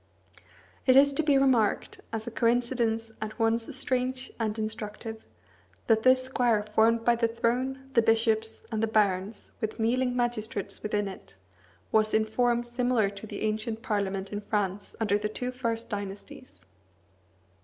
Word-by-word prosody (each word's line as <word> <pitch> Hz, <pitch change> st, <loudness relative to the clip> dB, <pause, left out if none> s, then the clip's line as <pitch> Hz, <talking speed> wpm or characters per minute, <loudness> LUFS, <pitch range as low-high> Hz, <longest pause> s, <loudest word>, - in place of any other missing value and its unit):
It 255 Hz, -, +6 dB
is 280 Hz, +1 st, +6 dB
to 275 Hz, -, +1 dB
be 295 Hz, -3 st, +3 dB
remarked, 255 Hz, -6 st, +2 dB
as 220 Hz, -1 st, -4 dB
a 235 Hz, -, -5 dB
coincidence 230 Hz, -1 st, +1 dB
at 215 Hz, 0 st, -5 dB
once 225 Hz, 0 st, +1 dB
strange 255 Hz, 0 st, -1 dB
and 220 Hz, -1 st, -1 dB
instructive, 220 Hz, 0 st, -4 dB, 0.6 s
that 220 Hz, 0 st, +3 dB
this 255 Hz, +2 st, +5 dB
square 245 Hz, -5 st, +1 dB
formed 230 Hz, +1 st, +3 dB
by 240 Hz, -, +5 dB
the 230 Hz, 0 st, +2 dB
throne, 250 Hz, +4 st, -1 dB
the 235 Hz, -, +5 dB
bishops, 225 Hz, 0 st, +1 dB
and 220 Hz, -1 st, -1 dB
the 225 Hz, -, +2 dB
barons, 205 Hz, -1 st, 0 dB
with 220 Hz, +1 st, -3 dB
kneeling 250 Hz, +2 st, +1 dB
magistrates 240 Hz, -3 st, -2 dB
within 210 Hz, -1 st, -1 dB
it, 190 Hz, -, -10 dB, 0.6 s
was 215 Hz, 0 st, +3 dB
in 220 Hz, 0 st, +3 dB
form 240 Hz, +2 st, +1 dB
similar 240 Hz, -3 st, +1 dB
to 200 Hz, +2 st, -9 dB
the -, -, -7 dB
ancient 220 Hz, +1 st, -2 dB
parliament 195 Hz, -3 st, -2 dB
in 205 Hz, -, -3 dB
France 205 Hz, -1 st, -2 dB
under 205 Hz, -2 st, +2 dB
the 210 Hz, -, -2 dB
two 250 Hz, +3 st, -3 dB
first 235 Hz, -2 st, -3 dB
dynasties. 195 Hz, -, -7 dB
225 Hz, 155 wpm, -28 LUFS, 215-245 Hz, 0.6 s, It